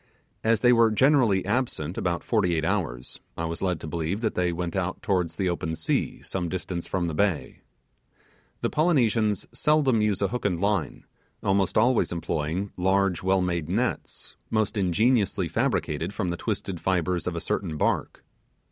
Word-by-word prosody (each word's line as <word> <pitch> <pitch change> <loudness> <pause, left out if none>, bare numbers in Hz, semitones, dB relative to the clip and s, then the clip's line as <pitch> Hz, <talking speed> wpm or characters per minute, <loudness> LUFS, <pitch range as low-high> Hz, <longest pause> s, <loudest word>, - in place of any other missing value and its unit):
As 110 -1 +2
they 125 0 +6
were 115 -1 +5
generally 115 -5 +3
absent 100 - -1
about 85 -1 -1
forty 95 -7 +1
eight 80 -1 0
hours, - - -2 0.2
I 85 - -2
was 85 0 -4
led 90 -4 0
to - - -6
believe 85 +6 -2
that 110 - 0
they 90 -1 +1
went 85 +1 -3
out 95 -1 -1
towards 90 -4 0
the 95 - -1
open 80 -2 -2
sea, - - -1
some 90 -3 -3
distance 90 -1 -4
from 90 -2 -1
the 85 - -2
bay. 95 -1 -1 1.0
The - - 0
Polynesians 115 - +2
seldom 135 -2 +2
use 105 -3 +1
a 100 - +1
hook 125 - -4
and 90 -4 0
line, 100 -4 -1 0.4
almost 95 -1 +1
always 120 +3 +3
employing 85 +3 -2
large 95 -1 +2
well 95 0 +2
made 85 -3 -1
nets, 120 +7 -2
most 110 -1 0
ingeniously 100 0 +2
fabricated 80 +3 -1
from 90 -5 -1
the - - -2
twisted 95 -4 -3
fibres 90 -2 0
of 90 - -2
a - - -1
certain 85 -2 -2
bark. - - -1
95 Hz, 170 wpm, -26 LUFS, 85-110 Hz, 1.0 s, they